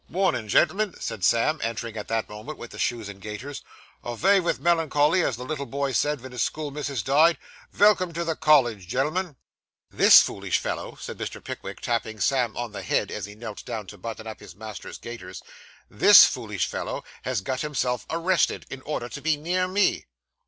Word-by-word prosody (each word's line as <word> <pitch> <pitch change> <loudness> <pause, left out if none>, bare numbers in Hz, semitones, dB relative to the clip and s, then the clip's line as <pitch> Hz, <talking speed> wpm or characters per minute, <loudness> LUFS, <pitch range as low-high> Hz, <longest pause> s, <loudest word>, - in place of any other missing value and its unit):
'Mornin', 180 - 0
gen'l'm'n,' 195 - +2
said 110 -5 -5
Sam, 135 - +3
entering 115 0 -3
at 105 - -6
the 115 -1 -1
moment 110 +9 -8
with 120 - -9
the - - -10
shoes 115 -4 -1
and 100 -1 -10
gaiters. 110 +8 -7 0.4
'Avay 190 - +3
vith 175 -2 -1
melincholly, 165 0 +3
as 135 - 0
the 125 - -7
little 140 -1 -4
boy 140 0 -2
said 145 +3 +1
ven 130 0 -9
his 125 -2 -3
schoolmissus 145 -4 -3
died. 155 +4 +4 0.3
Velcome 200 -4 +4
to 170 - -1
the 165 -1 -1
college, 125 - +3
gen'l'm'n.' 150 - -1 0.6
'This - - +8
foolish - - -1
fellow,' - - -4
said - - -7
Mr. - - -6
Pickwick, - - -7
tapping 110 -2 -2
Sam 125 +1 +1
on 120 -2 -3
the 105 - -6
head - - 0
as 105 - -4
he 105 - -11
knelt 110 -1 -8
down 110 -2 -5
to 105 +2 -11
button 110 +2 -6
up 110 -1 -7
his 100 -5 -12
master's 110 +1 -8
gaiters 105 -6 -9 0.4
'this - - +8
foolish - - -2
fellow - - -4 0.2
has 125 -5 -2
got 130 +6 -3
himself 130 -5 -2
arrested, 170 +1 +1
in 130 - -7
order 130 -4 -4
to 120 +4 -8
be 155 +1 +1
near 180 +4 0
me. 195 +2 +1
130 Hz, 190 wpm, -25 LUFS, 110-155 Hz, 0.6 s, This